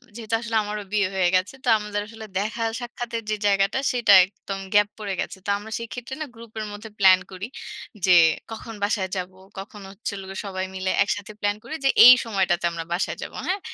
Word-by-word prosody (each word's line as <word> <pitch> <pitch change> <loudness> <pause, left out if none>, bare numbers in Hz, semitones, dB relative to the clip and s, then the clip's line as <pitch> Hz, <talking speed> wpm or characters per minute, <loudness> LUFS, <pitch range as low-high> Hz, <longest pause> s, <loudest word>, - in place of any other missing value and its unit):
যেহেতু 225 -1 -2
আসলে 230 -1 -4
আমারও 210 0 -4
বিয়ে 205 -2 +2
হয়ে 185 -2 +3
গেছে। 185 +7 +1
তো - - -7
আমাদের 210 0 -3
আসলে 220 0 -10
দেখা 215 +4 -2 0.2
সাক্ষাতের 240 -1 -5
যে 215 - +1
জায়গাটা 195 +4 +2
সেটা 235 -5 +4
একদম 195 0 -7
গ্যাপ 205 0 +5
পড়ে 205 -2 -3
গেছে। - - -5
তো - - -4
আমরা 210 +2 -10
সেইক্ষেত্রে 245 +3 -7
না 310 - -1
গ্রুপের 225 -1 -7
মধ্যে 210 +2 -9
প্লান 190 -1 +7
করি। 190 +1 -6 0.6
যে 185 - +4 0.4
কখন 225 0 -7
বাসায় 205 -2 0
যাবো, 185 0 -5 0.2
কখন 205 +1 -9
হচ্ছে 200 +3 -5
হলো 195 -1 -7
গিয়ে 195 - -5
সবাই 190 -1 -3
মিলে 185 0 -1
একসাথে 205 +1 -3
প্লান 205 0 +1
করি - - -8
যে - - +5 0.2
এই 250 - +12
সময়টাতে 190 -6 0
আমরা 165 -1 -5
বাসায় 180 - -1
যাব। - - -6 0.2
হ্যাঁ। 380 +2 0
205 Hz, 200 wpm, -24 LUFS, 195-225 Hz, 0.6 s, এই